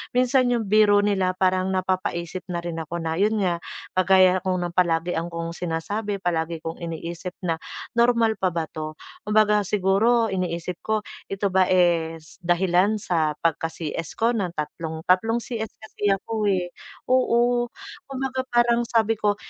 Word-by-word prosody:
minsan 255 +1 +3
'yong 230 -5 -1
biro 205 -1 +5
nila 190 -3 +1
parang 185 0 +2
napapaisip 185 -2 -1
na 175 -2 -3
rin 170 -1 -4
ako 160 +1 -5
na 160 +1 -2
'yon 210 +2 +3
nga, 175 -2 0 0.3
kagaya 185 0 +4
kong 185 0 -1
no'ng 175 - -3
napalagi 170 -1 +1
akong 170 0 -4
sinasabi, 180 +5 -3
palagi 165 -1 -1
kong 165 0 -5
iniisip 170 +2 -6
na 165 -2 -1 0.3
normal 235 -2 +3
pa 180 -3 0
ba 165 - 0
'to? 155 0 -6 0.3
Kumbaga, 210 -1 +3
siguro 210 +4 +2
iniisip 175 -1 -3
ko, 215 -1 -1 0.2
ito 195 0 -2
ba 185 0 +4
is 165 -3 +1
dahilan 180 +3 +2
sa 165 -7 0
pagka-CS 165 0 -2
ko 230 +1 +2
ng 190 -7 -2
tatlong 160 +1 -5
tatlong 225 +5 +2
CS 220 -3 -5
kasi 220 -1 -4
ako, 215 +2 -3
eh. 180 -1 -3 0.4
Oo, 240 -1 +3 0.4
kumbaga 265 -1 -3
parang 240 -1 +3
sabi 225 -1 +1
ko, 205 -1 +2
185 Hz, 150 wpm, -24 LUFS, 170-220 Hz, 0.4 s, biro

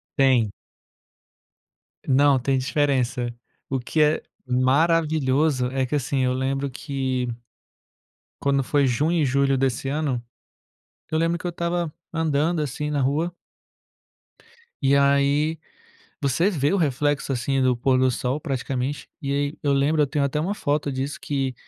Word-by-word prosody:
Tem. 130 -6 +3 1.5
Não, 140 0 +4
tem 135 +2 +1
diferença. 130 -3 0 0.4
O 135 - 0
que 140 +5 0
é 150 +1 +3 0.2
maravilhoso 140 +1 +2
é 135 0 0
que 130 - -2
assim, 140 0 -1
eu 125 0 +1
lembro 135 +2 -1
que 130 -2 -2 1.1
quando 140 -1 +2
foi 140 +1 +2
junho 150 +8 +1
e - - +3
julho 135 +1 +2
desse 135 0 0
ano, 140 -4 -1 0.9
eu 155 - +1
lembro 165 +1 +1
que 170 - -11
eu - - 0
estava 170 -1 -2 0.2
andando 160 0 +1
assim 150 +1 -3
na 145 -2 0
rua 155 +6 0 1.5
e 135 0 +4
aí, 140 +3 +3 0.6
você 150 +7 +2
vê 145 -5 0
o - - +3
reflexo 145 -3 0
assim 135 +2 0
do 130 -1 +3
pôr 130 +2 +2
do 130 0 +3
sol 125 +4 -2
praticamente, 135 -1 -3
e 140 - -2
aí 145 +1 -1
eu 145 - +2
lembro 145 +3 +2
eu - - +2
tenho 145 0 0
até 140 +2 -1
uma 185 +6 -1
foto 145 -5 -1
disso 135 +2 -3
que, 135 -3 -2
140 Hz, 145 wpm, -24 LUFS, 130-150 Hz, 1.5 s, Não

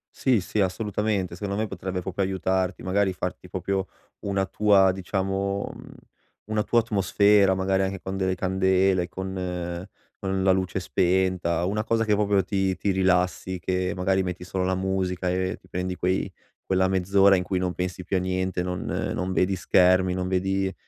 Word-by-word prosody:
Sì, 130 -4 +2
sì, 105 - -3
assolutamente. 100 -1 -1
Secondo 100 +1 -4
me 110 - -1
potrebbe 95 -1 -4
proprio 95 +2 -2
aiutarti. 95 -1 -1
Magari 95 +1 +1
farti 90 0 -5
proprio 95 +1 -2 0.3
una 100 -1 0
tua 100 -1 +4
diciamo, 95 +1 -2
mhmm, - - -12 0.5
una 110 0 -1
tua 120 - +3
atmosfera, 100 -2 +3
magari 95 0 +1
anche 95 0 -3
con 95 0 -4
delle 95 -1 0
candele, 95 0 +2
con 90 -1 -4 0.3
con 95 -1 -1
la 95 - +2
luce 95 0 0
spenta, 90 -2 +1
una 105 +3 -1
cosa 115 0 +1
che 105 -2 +2
proprio 100 -2 +2
ti 95 -1 0
ti 100 - -2
rilassi, 95 -1 +1
che 90 +1 -1
magari 95 +1 +1
metti 90 -1 -5
solo 95 +1 -2
la 95 0 +1
musica 95 -1 -1
e 95 +1 -1
ti 90 - -21
prendi 90 0 -3
quei 90 +1 -1 0.3
quella 95 0 +2
mezz'ora 95 +1 +4
in 90 - 0
cui 95 0 -1
non 90 -1 -1
pensi 90 0 -3
più 95 +2 -1
a - - +2
niente, 95 0 -1
non 90 0 -3 0.3
non 95 +1 -2
vedi 95 +1 +1
schermi, 90 0 +3
non 90 0 -2
vedi, 95 +1 0
95 Hz, 170 wpm, -25 LUFS, 90-95 Hz, 0.5 s, tua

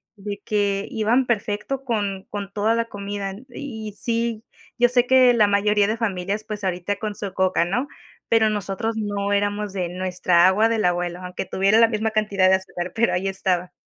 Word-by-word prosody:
de 200 -1 -6
que 200 -2 0
iban 235 +2 +1
perfecto 230 +3 -2
con 205 -6 -2
con 200 -1 -5
toda 215 +2 +1
la 230 0 0
comida. 200 -2 -5 0.2
Y 225 -5 -7
sí, 230 -1 -1 0.3
yo 245 -1 +5
sé 245 0 +3
que 255 -1 +6
la 215 -3 +4
mayoría 205 0 +2
de 220 +2 -1
familias, 200 -1 -2
pues, 210 -1 -6
ahorita 185 +1 -1
con 210 0 -4
su 200 -2 -5
Coca, 185 -2 +2
¿no?, 245 +11 -1 0.4
pero 225 -1 +4
nosotros, 210 +2 -2
no, 205 -1 -2
éramos 205 0 0
de 185 -2 -2
nuestra 180 -1 +2
agua 205 +4 +4
del 225 -2 0
abuelo, 175 0 0
aunque 180 +1 -5
tuviera 195 +4 +2
la 230 - +7
misma 220 0 -1
cantidad 205 -3 +2
de 190 - +6
azúcar, 185 -1 -5
pero 230 +1 +1
ahí 190 +2 0
estaba. 185 -2 -1
205 Hz, 185 wpm, -23 LUFS, 190-225 Hz, 0.4 s, la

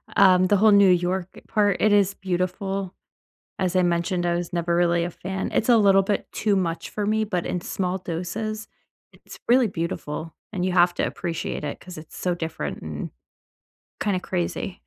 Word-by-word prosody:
um, 185 -1 +6
the 205 - +4
whole 215 +2 +5
New 200 -1 +6
York 180 0 +1 0.2
part, 205 -3 +2
it 215 - +4
is 200 -1 +4
beautiful, 190 +1 -2 0.6
as 185 -2 -1
I 185 - +5
mentioned, 175 +1 0
I 170 0 +1
was 175 0 -4
never 170 0 0
really 170 -1 +2
a 175 - -2
fan. 190 +3 -5
It's 225 - +1
a 240 - +7
little 195 -2 +5
bit 205 +1 -1
too 210 -2 +1
much 165 -3 -2
for 210 - -2
me, 215 +1 +1
but 185 -5 -2
in 180 - -2
small 185 0 -2
doses, 205 +6 -4 0.4
it's - - -14
really 245 0 +5
beautiful, 165 -3 -4 0.2
and 180 -3 -2
you 185 - 0
have 175 -1 +4
to - - -1
appreciate 165 -3 -4
it 150 - -4
'cause 180 -3 -11
it's 155 0 -11
so 180 -1 -1
different 160 -2 -5
and 80 -2 -6 0.9
kinda 200 -3 0
crazy 180 +1 -3
185 Hz, 185 wpm, -24 LUFS, 175-200 Hz, 0.9 s, a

